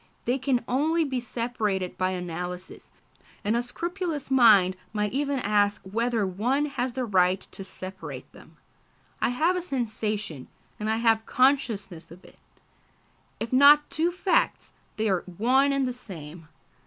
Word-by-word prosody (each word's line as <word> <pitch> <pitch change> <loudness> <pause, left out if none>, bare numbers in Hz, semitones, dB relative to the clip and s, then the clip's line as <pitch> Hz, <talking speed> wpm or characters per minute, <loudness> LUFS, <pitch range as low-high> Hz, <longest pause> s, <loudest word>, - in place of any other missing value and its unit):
They 250 +3 0
can 255 -2 0
only 315 +6 +1
be 265 -4 -2
separated 225 -6 -2
by 185 0 0
analysis, 180 0 -6 0.5
and 215 +2 +1
a 235 - +2
scrupulous 335 +3 -4
mind 210 -8 +6 0.2
might 210 0 -1
even 280 0 0
ask 205 -3 +1
whether 230 +2 0
one 240 +10 0
has 260 -4 -3
the 255 0 -2
right 185 -3 +3
to 195 - -9
separate 190 0 -8
them. - - -17 0.6
I - - +2
have 315 +9 +1
a 360 - -1
sensation, 215 - -3 0.3
and 215 +1 -2
I 220 - +1
have 225 -1 +2
consciousness 220 - +1
of 175 +3 -14
it. - - -18 1.0
If 230 - -4
not 290 +3 +6
two 325 +3 +1
facts, 365 +2 0 0.2
they 220 0 0
are 190 -4 +1 0.2
one 265 +5 +3
and 275 -1 +1
the 250 - -2
same. 165 -8 -10
230 Hz, 150 wpm, -26 LUFS, 195-270 Hz, 1.0 s, mind